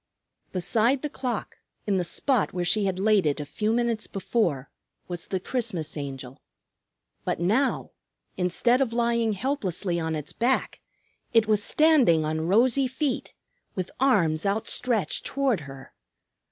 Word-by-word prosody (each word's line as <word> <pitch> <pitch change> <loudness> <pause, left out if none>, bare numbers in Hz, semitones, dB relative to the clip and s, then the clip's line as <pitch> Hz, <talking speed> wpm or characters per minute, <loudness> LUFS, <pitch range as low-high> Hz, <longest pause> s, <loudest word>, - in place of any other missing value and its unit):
Beside 230 - +1
the 300 - -3
clock, 250 -5 -4 0.3
in 200 -2 +1
the 180 - 0
spot 250 - +1
where 180 -1 -2
she 205 +3 +2
had 190 -2 -1
laid 200 -3 +3
it 145 +1 0
a 150 - -4
few 210 +9 -2
minutes 230 -2 0
before, 180 - -1 0.4
was 175 -2 -4
the 190 - -2
Christmas 185 - -3
Angel. 135 -3 -7 0.8
But - - -2
now, 220 +11 +1 0.4
instead 215 +8 +2
of 240 -4 0
lying 235 -2 +1
helplessly 195 - -2
on 160 -1 -2
its 150 -1 -6
back, 250 +3 0 0.5
it 225 -2 +5
was 210 -1 +2
standing 265 - +4
on 160 +1 -2
rosy 250 +7 +3
feet, 265 +1 -3 0.4
with 185 -1 -4
arms 175 - +2
outstretched 220 +2 0
toward 270 -7 0
her. 135 -1 -12
210 Hz, 140 wpm, -26 LUFS, 170-245 Hz, 0.8 s, it